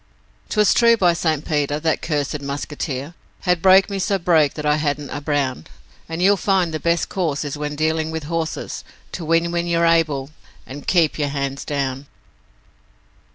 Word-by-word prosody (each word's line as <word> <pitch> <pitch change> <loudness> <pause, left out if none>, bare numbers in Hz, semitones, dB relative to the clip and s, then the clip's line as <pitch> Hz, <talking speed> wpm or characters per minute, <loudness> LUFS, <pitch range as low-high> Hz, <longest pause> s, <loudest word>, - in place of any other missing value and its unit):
''Twas 210 -1 +3
true, 235 -1 +5
by 180 -4 +4
St. 160 -3 -1
Peter, 145 -1 0
that 160 0 0
cursed 150 -1 -2
'muskeeter' 140 +1 -4 0.3
Had 180 -2 +1
broke 190 +1 +6
me 200 -1 -4
so 195 +1 +1
broke 165 -5 +2
that 150 - -5
I 150 0 +3
hadn't 145 -2 -2
a 145 - -4
brown, 140 - -1 0.4
And 165 +2 -2
you'll 200 +1 +5
find 185 -4 +1
the 155 - -2
best 170 +1 +1
course 155 -6 -2
is 145 - -4
when 150 0 -4
dealing 160 +1 0
with 160 -1 -4
horses 160 +1 -4 0.3
To 175 - -6
win 165 +1 +1
when 170 0 -1
you're 170 0 +2
able, 155 -4 +1 0.3
and 145 +2 -10
KEEP 165 -4 +2
YOUR 145 -1 0
HANDS 140 -1 -3
DOWN. 140 -1 -3
155 Hz, 175 wpm, -21 LUFS, 145-170 Hz, 0.4 s, broke